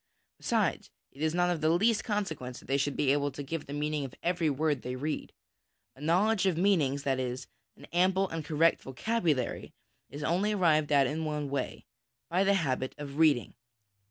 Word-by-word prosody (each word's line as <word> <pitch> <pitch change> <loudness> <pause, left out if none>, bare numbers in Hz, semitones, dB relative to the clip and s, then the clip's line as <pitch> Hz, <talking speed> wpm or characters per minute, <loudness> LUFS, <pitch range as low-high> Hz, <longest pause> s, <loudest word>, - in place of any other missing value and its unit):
Besides, - - 0 0.2
it 140 - -13
is 160 +1 +1
not 180 0 +2
of 165 -3 -2
the 155 - +3
least 210 +7 +3
consequence 160 - -3
that - - -13
they 135 - +1
should 140 0 -1
be 140 -3 +3
able 145 0 +1
to 145 +1 -7
give 155 +2 -5
the - - -8
meaning 150 0 -1
of 135 -1 -7
every 170 -2 +1
word 145 -1 0
they 125 +1 -4
read. 150 +4 -3 0.6
A 135 - -16
knowledge 190 +6 +2
of 180 -4 +1
meanings, 155 -8 +2
that 135 -2 0
is, 125 0 -3 0.3
an - - -12
ample 190 +2 +3
and 165 -1 -4
correct 165 +2 +2
vocabulary, 155 - -1 0.4
is 145 +2 -7
only 190 +7 +1
arrived 155 -6 +2
at 140 -2 +5
in 155 +5 -2
one 150 -2 -3
way 140 - -3 0.5
by 185 +3 +3
the 200 0 +3
habit 130 -7 -1
of 145 0 -7
reading. 150 -7 +3
155 Hz, 190 wpm, -30 LUFS, 140-175 Hz, 0.6 s, at